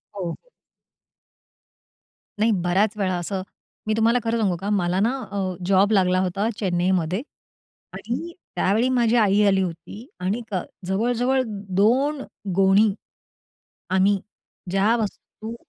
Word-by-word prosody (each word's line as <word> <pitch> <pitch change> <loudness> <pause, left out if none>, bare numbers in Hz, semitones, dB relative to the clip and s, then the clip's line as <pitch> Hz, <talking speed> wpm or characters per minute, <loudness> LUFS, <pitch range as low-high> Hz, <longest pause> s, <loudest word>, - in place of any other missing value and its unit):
हो. 175 -4 -3 2.0
नाही, 225 +1 +3
बऱ्याच 200 +5 +2
वेळा 185 -3 0
असं 185 +2 -3 0.5
मी 215 - +2
तुम्हाला 230 +2 +3
खरं 230 +1 0
सांगू 190 -5 +1
का? 195 +4 -4
मला 185 -2 +1
ना 225 +4 +2 0.2
अ, 190 -2 -2
जॉब 195 +2 +3
लागला 185 -2 +3
होता 190 +4 0
चेन्नईमध्ये 180 0 0 0.7
आणि 330 +9 -5 0.2
त्यावेळी 220 +6 +2
माझी 240 -2 +2
आई 205 -1 +4
आली 195 -1 +3
होती 185 - -6
आणिक 210 +4 -3 0.3
जवळ-जवळ 245 +6 +1 0.3
दोन 265 +8 +2 0.3
गोणी 195 +2 +4 1.0
आम्ही 190 +1 +3 0.5
ज्या 195 +4 +3
वस्तू 220 +1 -5
200 Hz, 115 wpm, -23 LUFS, 185-225 Hz, 2.0 s, आई